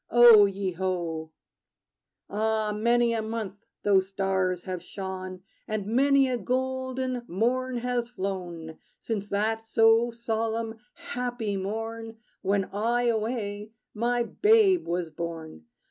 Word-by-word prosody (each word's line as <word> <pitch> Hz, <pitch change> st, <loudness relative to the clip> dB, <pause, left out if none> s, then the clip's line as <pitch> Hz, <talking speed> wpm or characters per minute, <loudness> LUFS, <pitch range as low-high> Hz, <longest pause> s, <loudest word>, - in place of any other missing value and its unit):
O 235 Hz, -3 st, +8 dB
ye 195 Hz, -1 st, -3 dB
ho! 170 Hz, -3 st, -3 dB, 1.0 s
Ah, 215 Hz, 0 st, 0 dB
many 235 Hz, +2 st, +3 dB
a 225 Hz, -, 0 dB
month 220 Hz, -2 st, -5 dB, 0.2 s
those 190 Hz, -2 st, +3 dB
stars 190 Hz, -2 st, -1 dB
have 185 Hz, -2 st, -4 dB
shone, 185 Hz, 0 st, -6 dB, 0.2 s
And 215 Hz, -2 st, -2 dB
many 270 Hz, +5 st, +4 dB
a 250 Hz, -2 st, -1 dB
golden 260 Hz, +1 st, -2 dB
morn 245 Hz, +6 st, 0 dB
has 240 Hz, 0 st, -1 dB
flown, 180 Hz, -7 st, -5 dB, 0.2 s
Since 205 Hz, -3 st, -4 dB
that 220 Hz, +2 st, 0 dB
so 225 Hz, +1 st, +4 dB
solemn, 225 Hz, -1 st, -3 dB, 0.2 s
happy 245 Hz, -4 st, -3 dB
morn, 225 Hz, +3 st, -4 dB, 0.2 s
When, 195 Hz, 0 st, +1 dB
I 235 Hz, +4 st, +1 dB
away, 215 Hz, -2 st, -2 dB, 0.2 s
my 240 Hz, +2 st, +1 dB
babe 405 Hz, -, +4 dB
was 170 Hz, -1 st, -2 dB
born. 160 Hz, -, -6 dB
220 Hz, 115 wpm, -27 LUFS, 190-240 Hz, 1.0 s, O